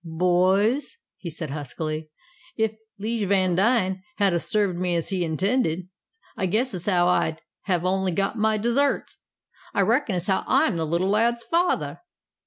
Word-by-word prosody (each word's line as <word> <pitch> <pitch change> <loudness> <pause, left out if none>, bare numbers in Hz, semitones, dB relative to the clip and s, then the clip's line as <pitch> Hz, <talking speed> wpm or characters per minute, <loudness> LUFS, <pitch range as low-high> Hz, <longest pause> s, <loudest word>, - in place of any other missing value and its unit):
"Boys," 185 - +1 0.3
said 165 -1 -5
he, - - -5
huskily, 155 +2 -4 0.5
"ef 220 -1 +1 0.3
'Lije 220 0 -2
Vandine 190 +1 +2 0.2
had 200 -3 +3
'a' 170 - +2
served 200 0 0
me 180 -1 0
as 165 - -1
he 190 -3 0
intended, 180 - 0 0.5
I 190 - -1
guess 230 +7 0
as 180 0 -3
how 175 -3 +3
I'd 160 -3 +1 0.3
have 180 -3 0
only 190 0 +1
got 195 +5 -1
my 220 -1 +2
deserts. 240 +6 0 0.6
I - - +3
reckon 235 -2 +1
as 175 -1 -2
how 190 -1 +1
I'm - - +3
the 160 -1 -1
little 170 +4 0
lad's 235 +3 +2
father!" 345 +2 0
190 Hz, 160 wpm, -24 LUFS, 175-220 Hz, 0.6 s, had